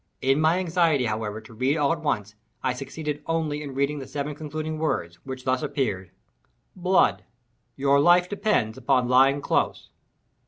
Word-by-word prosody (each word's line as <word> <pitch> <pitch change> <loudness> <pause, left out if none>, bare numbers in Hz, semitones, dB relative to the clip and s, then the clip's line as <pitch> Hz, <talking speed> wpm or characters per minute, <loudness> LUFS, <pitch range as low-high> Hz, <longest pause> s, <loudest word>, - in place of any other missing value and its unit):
In 135 +3 +2
my 160 +3 +3
anxiety, 165 -6 +2
however, 110 -1 -3
to 110 +1 -15
read 130 +7 0
all 145 +1 +2
at 165 - -6
once, 105 -9 -2 0.3
I 130 - +1
succeeded 150 +3 -5
only 160 -2 -1
in 140 -3 -7
reading 140 +2 0
the 135 - -8
seven 145 +1 -4
concluding 155 +1 -5
words, 85 - -2
which 130 -1 -6
thus 130 0 0
appeared—"blood—your 120 - -2
life 175 +4 +5
depends 185 - 0
upon 130 -3 +2
lying 135 +3 +4
close." - - -1
140 Hz, 150 wpm, -25 LUFS, 120-155 Hz, 0.3 s, life